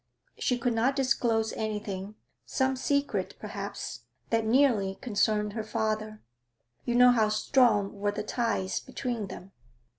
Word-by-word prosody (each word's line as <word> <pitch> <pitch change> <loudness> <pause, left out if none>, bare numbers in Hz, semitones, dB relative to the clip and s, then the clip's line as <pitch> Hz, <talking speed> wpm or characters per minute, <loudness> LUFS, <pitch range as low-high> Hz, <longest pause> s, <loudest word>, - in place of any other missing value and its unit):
She 250 - +1
could 245 0 0
not 240 +4 +2
disclose 235 -4 +1
anything 210 -2 -4 0.3
some 265 0 0
secret, 280 +2 -1
perhaps - - -6 0.3
that 225 -1 +1
nearly 225 -6 +3
concerned 210 -2 0
her 220 -1 -3
father; 215 -1 -2 0.6
you 240 - 0
know 250 0 +8
how 220 -3 +3
strong 215 -2 +3
were 205 0 +1
the 210 - -4
ties 225 -4 -1
between 245 -5 -4
them.' 190 0 -10
220 Hz, 130 wpm, -29 LUFS, 210-250 Hz, 0.6 s, know